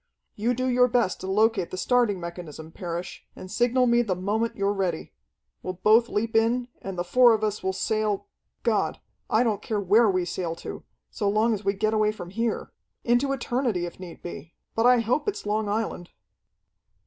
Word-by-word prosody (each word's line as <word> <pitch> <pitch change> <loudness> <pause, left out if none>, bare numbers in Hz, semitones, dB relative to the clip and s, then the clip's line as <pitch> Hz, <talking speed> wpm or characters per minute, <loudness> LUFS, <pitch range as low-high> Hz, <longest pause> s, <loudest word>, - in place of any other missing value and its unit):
"You 235 +4 0
do 255 +2 -1
your 250 0 +4
best 240 -6 +1
to 190 - -5
locate 210 -2 +2
the 185 - -6
starting 235 -2 +2
mechanism, 170 -2 -8
Parrish, 175 0 -6
and 185 - -10
signal 245 +3 +2
me 240 0 +4
the 205 -6 -1
moment 210 +5 -1
you're 200 0 0
ready. 190 -3 -2 0.5
We'll 185 - -4
both 220 +6 +4
leap 225 +2 -2
in, 240 +2 +2
and 195 -2 -6
the 175 - 0
four 240 +6 +5
of 215 - -4
us 210 -1 -1
will 190 - 0
sail 210 +1 -1 0.4
God, - - +1 0.3
I 220 +3 +3
don't 215 -4 0
care 215 -1 -2
where 210 +4 +4
we 185 -2 +1
sail 175 -2 -3
to, - - -8 0.3
so 205 -4 -1
long 215 +3 +2
as 210 -1 -4
we 195 0 +1
get 215 +2 0
away 215 -1 +3
from 180 -5 -9
here! 230 +3 -2 0.3
Into 245 +4 +2
eternity, 240 -7 -1
if 175 - -9
need 175 -3 -10
be. 170 -2 -8 0.2
But 225 +2 +3
I 250 -1 +5
hope 245 - 0
it's 410 - -6
Long 210 0 0
Island!" 205 -4 -2
215 Hz, 195 wpm, -26 LUFS, 185-235 Hz, 0.5 s, four